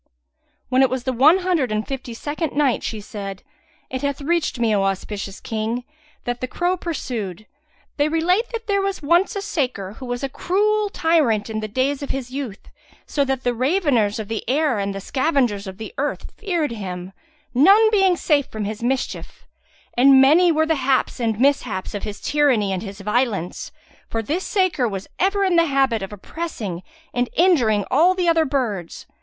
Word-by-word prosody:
When 255 +1 +3
it 265 - +5
was 260 -1 -3
the 260 - -1
One 290 +9 +6
Hundred 320 -11 +1
and 215 0 -1
Fifty 255 -3 -5
second 300 +4 -3
Night 285 -3 +2
She 220 - -4
said, 200 -2 -7 0.5
It 260 - -3
hath 280 -1 -2
reached 325 0 0
me, 230 -2 +2
O 200 - +2
auspicious 195 +1 -3
King, 225 0 -3 0.4
that 245 0 -3
the 255 - -2
crow 355 +7 0
pursued, 230 - -4 0.5
"They 290 +1 +2
relate 360 +8 +1
that 460 -1 -5
there 400 -1 +1
was 390 -4 -2
once 345 +7 +3
a 400 - -3
saker 250 - -2
who 260 - -7
was 245 +2 -3
a - - +1
cruel 415 +8 +1
tyrant 305 - +1
in 215 - -2
the 215 - -4
days 260 +6 -1
of 280 - -5
his 255 -2 -4
youth, 260 -7 -6 0.4
so 285 - 0
that 265 -1 -2
the 245 - +1
raveners 255 - +1
of 220 -2 -5
the 225 0 -3
air 280 -4 +2
and 200 0 -2
the 195 - -5
scavengers 255 - 0
of 190 0 -7
the 220 -2 -8
earth 290 +1 -3
feared 345 - -1
him, 185 -4 -6 0.4
none 395 - +6
being 385 -4 +4
safe 290 -5 +2
from 215 -1 -5
his 215 +1 -5
mischief; 255 +2 -3 0.5
and 265 +2 +7
many 320 +7 +6
were 315 0 +2
the 320 - +2
haps 265 -1 +1
and 225 -3 -1
mishaps 250 -8 +1
of 205 - -4
his 210 -1 -6
tyranny 260 -10 +2
and 185 - -2
his 200 -1 -8
violence, 210 -4 -1 0.4
for 225 0 -2
this 325 - -2
saker 370 - +1
was 195 -3 -5
ever 395 +2 +2
in 365 -3 +2
the 335 - +5
habit 270 -6 +2
of 195 - -5
oppressing 210 - -5 0.3
and 245 0 0
injuring 245 - +3
all 340 +7 +4
the 360 -2 0
other 330 -1 +4
birds. 230 - -3
260 Hz, 190 wpm, -22 LUFS, 215-325 Hz, 0.5 s, and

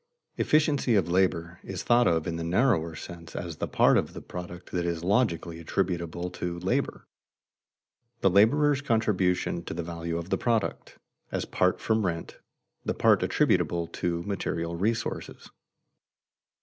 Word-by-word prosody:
"Efficiency 145 -5 +2
of 85 -4 +2
labor" 90 -2 +1
is 95 - -5
thought 120 0 +4
of 80 -2 +2
in 85 - -2
the 85 - -3
narrower 85 -3 +2
sense 85 0 -9
as 85 -3 -5
the - - -2
part - - +4
of - - -4
the - - -7
product 90 0 -8
that 90 - -1
is 85 -1 -2
logically 85 -5 +1
attributable 85 0 -2
to 90 -1 -4
labor, 125 +10 -1 1.2
the 95 - +5
laborer's 140 +9 +4
contribution 95 -8 +1
to - - -6
the 85 - -3
value 85 0 -4
of 85 +2 -6
the - - +1
product, 115 -3 -1 0.3
as - - -1
apart - - +1
from 110 -1 +1
rent, 85 -3 -3 0.4
the - - -2
part - - +4
attributable 85 -1 +2
to 85 0 -3
material 85 -3 -2
resources. 110 +5 -3
90 Hz, 150 wpm, -28 LUFS, 85-110 Hz, 1.2 s, the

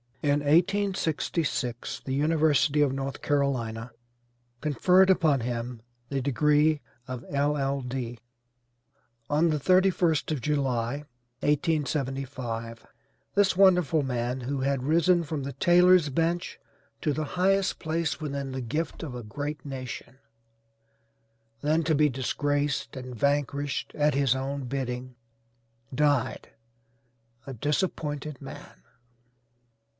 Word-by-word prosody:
In 145 0 +3
1866 160 - 0
the 130 - -2
University 150 0 +3
of 145 -2 +3
North 135 0 -4
Carolina 125 -5 -1 0.7
conferred 180 +7 +4
upon 155 -8 +3
him 120 0 -4 0.3
the 135 -1 -1
degree 150 +3 +3 0.3
of 130 -2 -5
LL.D. 135 -4 -1 1.1
On 155 +3 +3
the 155 -1 0
31st 180 -2 +3
of 150 -5 -2
July, 135 -1 -1 0.4
1875, 135 -6 -1 0.5
this 200 -2 +3
wonderful 180 -6 +4
man, 125 0 -2
who 135 +2 -3
had 135 -1 0
risen 170 +4 +3
from 150 -2 -4
the 140 +1 -5
tailor's 175 +2 +5
bench, 165 +5 -1 0.4
to 150 - +1
the 155 - -2 0.2
highest 195 +1 +2
place 160 0 -1
within 140 -3 -4
the 130 0 -4
gift 150 +8 -3
of 145 -6 -5
a 120 - -6
great 145 +7 -5
nation, 130 -1 -7 1.4
then 155 +3 +2
to 160 0 +1
be 150 +1 +4
disgraced 145 +3 -1
and 125 -1 -7
vanquished 140 +1 -1
at 150 0 +2
his 135 -3 +3
own 135 +1 -3
bidding, 125 -1 -4 0.8
died 145 -2 +1 1.0
a 135 - -5
disappointed 150 - -2
man. - - -10
145 Hz, 110 wpm, -27 LUFS, 130-155 Hz, 1.4 s, tailor's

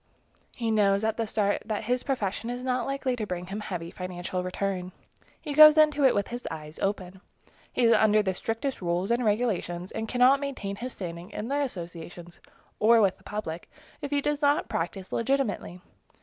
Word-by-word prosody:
He 230 -2 -1
knows 200 -1 +3
at 220 0 0
the 225 -1 -1
start 205 -1 0
that 215 0 -3
his 245 +3 0
profession 230 -4 -2
is 245 +1 -4
not 255 -1 -1
likely 275 -2 -1
to 220 -3 -4
bring 180 -1 -4
him 195 +3 -5
heavy 175 -5 -5
financial 180 0 -4
return. 185 0 -3 0.5
He 295 - -5
goes 305 +1 +9
into 300 -2 +4
it 260 - +5
with 200 -1 0
his 240 +1 -6
eyes 155 -1 -8
open. 190 -2 -3 0.5
He 250 - 0
is 230 0 +6
under 215 -1 +4
the 190 -2 0
strictest 225 +7 -3
rules 175 +3 -1
and 240 +1 +2
regulations, 205 -5 -1
and 220 0 -4
cannot 255 +3 +4
maintain 255 -9 -4
his 255 +3 -5
standing 170 -1 -7
in 215 +3 -5
the 285 +1 +1
associations, 175 - -7 0.4
or 230 +2 +6
with 195 -3 +2
the - - -23
public, 175 -6 -5 0.3
if 285 - -4
he 285 0 +1
does 295 +1 -1
not 290 0 +2
practice 185 +3 -3
legitimately. 230 -8 -1
215 Hz, 190 wpm, -27 LUFS, 185-250 Hz, 0.5 s, goes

